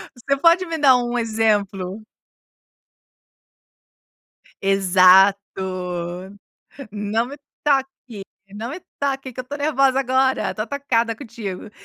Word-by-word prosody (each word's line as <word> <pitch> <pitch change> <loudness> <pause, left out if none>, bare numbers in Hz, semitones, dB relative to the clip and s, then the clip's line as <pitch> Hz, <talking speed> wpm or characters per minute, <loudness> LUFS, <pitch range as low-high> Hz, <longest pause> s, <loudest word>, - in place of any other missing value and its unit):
Você 275 +3 -1
pode 340 +5 +4
me 325 -1 -3
dar 270 -4 +6
um 245 0 -2
exemplo? 210 -3 -1 2.6
Exato, 195 0 +5 1.5
"Não 210 +3 -2
me 285 +3 -9 0.3
toque, 270 -6 -1 0.3
não 225 +4 -5
me 355 +5 -7 0.2
toque 270 -2 -2
que 255 - -6
eu - - -7
tô 285 +3 -6
nervosa 275 -3 +2
agora, 260 0 +1
tô 215 - -3
atacada 235 -2 -1
contigo". 215 -6 -7
240 Hz, 105 wpm, -21 LUFS, 205-275 Hz, 2.6 s, dar